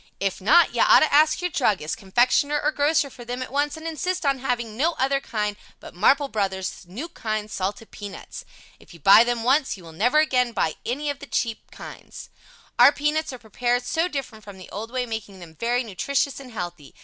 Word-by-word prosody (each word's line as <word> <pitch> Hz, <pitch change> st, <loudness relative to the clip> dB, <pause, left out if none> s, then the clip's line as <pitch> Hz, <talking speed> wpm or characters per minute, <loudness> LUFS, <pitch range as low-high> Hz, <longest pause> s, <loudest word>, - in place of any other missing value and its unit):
If 195 Hz, -1 st, -2 dB
not, 305 Hz, -, +5 dB
you -, -, +1 dB
ought -, -, +7 dB
to 310 Hz, -, +2 dB
ask 310 Hz, +4 st, +4 dB
your 360 Hz, -, -1 dB
Druggist, 210 Hz, -, 0 dB
Confectioner 245 Hz, +8 st, +2 dB
or 300 Hz, -, +1 dB
Grocer 290 Hz, -1 st, +1 dB
for 245 Hz, -, -11 dB
them 245 Hz, +2 st, -4 dB
at -, -, -10 dB
once 290 Hz, +2 st, -1 dB
and 315 Hz, -, -10 dB
insist 330 Hz, +2 st, -3 dB
on 275 Hz, -1 st, +1 dB
having 240 Hz, -4 st, -2 dB
no 315 Hz, +8 st, +1 dB
other 275 Hz, -2 st, 0 dB
kind 210 Hz, -5 st, -3 dB, 0.2 s
but -, -, -12 dB
"Marple 275 Hz, +10 st, +3 dB
Bros. 190 Hz, -5 st, -3 dB
New 235 Hz, -, -6 dB
Kind 215 Hz, -9 st, -4 dB
Salted 200 Hz, +4 st, -4 dB
Peanuts." 205 Hz, -2 st, -9 dB, 0.4 s
If -, -, -16 dB
you -, -, -15 dB
buy 195 Hz, +8 st, +8 dB
them 240 Hz, -1 st, -2 dB
once 265 Hz, 0 st, +2 dB
you 185 Hz, -, -14 dB
will 165 Hz, -, -11 dB
never 235 Hz, -, +1 dB
again 250 Hz, -6 st, +2 dB
buy 160 Hz, -, 0 dB
any 285 Hz, +5 st, -1 dB
of 280 Hz, -, -9 dB
the 280 Hz, -, -9 dB
other -, -, -33 dB
cheap 230 Hz, -2 st, -2 dB
kinds. -, -, -11 dB, 0.5 s
Our -, -, +9 dB
peanuts 300 Hz, +1 st, -1 dB
are 255 Hz, -, -7 dB
prepared 245 Hz, +2 st, -1 dB
so 325 Hz, +7 st, 0 dB
different 270 Hz, -9 st, -6 dB
from 200 Hz, -2 st, -11 dB
the 185 Hz, -, -13 dB
old 215 Hz, +4 st, -6 dB
way, 250 Hz, 0 st, -2 dB
making 220 Hz, -4 st, -6 dB
them 170 Hz, -3 st, -12 dB
very 240 Hz, +8 st, -1 dB
nutritious 270 Hz, +7 st, -1 dB
and 260 Hz, -2 st, -11 dB
healthy. 175 Hz, -8 st, -7 dB
245 Hz, 215 wpm, -24 LUFS, 210-285 Hz, 0.5 s, Our